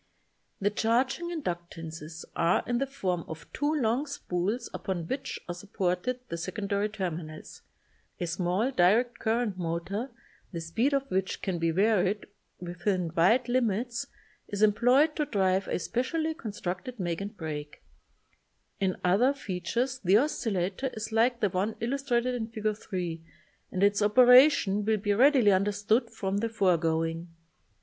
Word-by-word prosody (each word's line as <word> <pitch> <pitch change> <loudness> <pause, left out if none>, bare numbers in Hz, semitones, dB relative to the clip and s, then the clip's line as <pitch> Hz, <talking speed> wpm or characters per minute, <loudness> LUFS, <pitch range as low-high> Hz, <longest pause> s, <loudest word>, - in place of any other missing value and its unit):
The 205 +1 +1
charging 250 +10 +1
inductances 170 - -6
are 170 +1 +2
in 240 0 0
the 275 - 0
form 185 -10 -2
of 160 0 -8
two 290 +1 0
long 270 -1 +1
spools 210 -4 -2
upon 185 -4 -3
which 270 +5 -4
are 175 - -3
supported 190 +5 -2
the 170 - -4
secondary 200 +3 -2
terminals. 170 -6 -6 0.6
A 175 - -1
small 180 +8 0
direct 235 +4 +3
current 220 -4 0
motor, 175 +8 -3 0.4
the 170 - -4
speed 195 - 0
of 275 -1 +2
which 190 +1 -1
can 185 -3 -1
be 165 0 +1
varied 200 +2 +2 0.3
within 180 0 -2
wide 225 +10 +4
limits, 240 -1 0 0.4
is 205 0 -1
employed 250 +8 +4
to 300 - +1
drive 190 -3 +1
a - - -1
specially 315 - -1
constructed 215 - -5
make 175 -1 -2
and 205 +2 -6
break. 150 -2 -6 1.0
In 190 -2 +1
other 220 +10 +3
features 235 +5 -2
the 195 -1 +4
oscillator 220 - -1
is 220 0 -5
like 235 +2 +2
the 205 - +3
one 195 +5 -1
illustrated 250 0 0
in 230 -3 -3
Fig. 215 -1 -2
3 175 -6 -5 0.5
and 185 - 0
its 205 +1 +3
operation 250 -1 +6
will 215 +1 +2
be 205 0 0
readily 250 -1 +5
understood 205 +5 +1
from 195 -2 -3
the 230 +2 -1
foregoing. 165 -5 +1
205 Hz, 140 wpm, -28 LUFS, 180-245 Hz, 1.0 s, operation